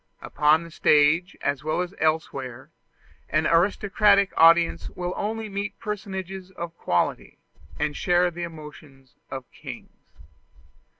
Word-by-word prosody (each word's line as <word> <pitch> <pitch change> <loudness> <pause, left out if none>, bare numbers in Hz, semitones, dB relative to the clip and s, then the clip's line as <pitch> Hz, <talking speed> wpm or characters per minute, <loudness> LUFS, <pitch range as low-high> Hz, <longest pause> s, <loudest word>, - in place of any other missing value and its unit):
Upon 150 +2 +3
the 170 - -11
stage, 155 +6 +3
as 140 -1 -1
well 155 +3 0
as 180 +1 -4
elsewhere, 135 -5 -2 0.6
an 155 +1 +1
aristocratic 200 +3 +3
audience 165 +1 +4
will 180 0 -4
only 220 +1 -3
meet 200 +1 -5
personages 190 -3 -5
of 170 -2 -7
quality, 90 - -1 0.4
and 150 0 -1
share 175 0 +2
the 175 +1 -8
emotions 150 -5 -10 0.2
of 130 -1 -6
kings. - - -11
170 Hz, 120 wpm, -25 LUFS, 150-190 Hz, 0.6 s, audience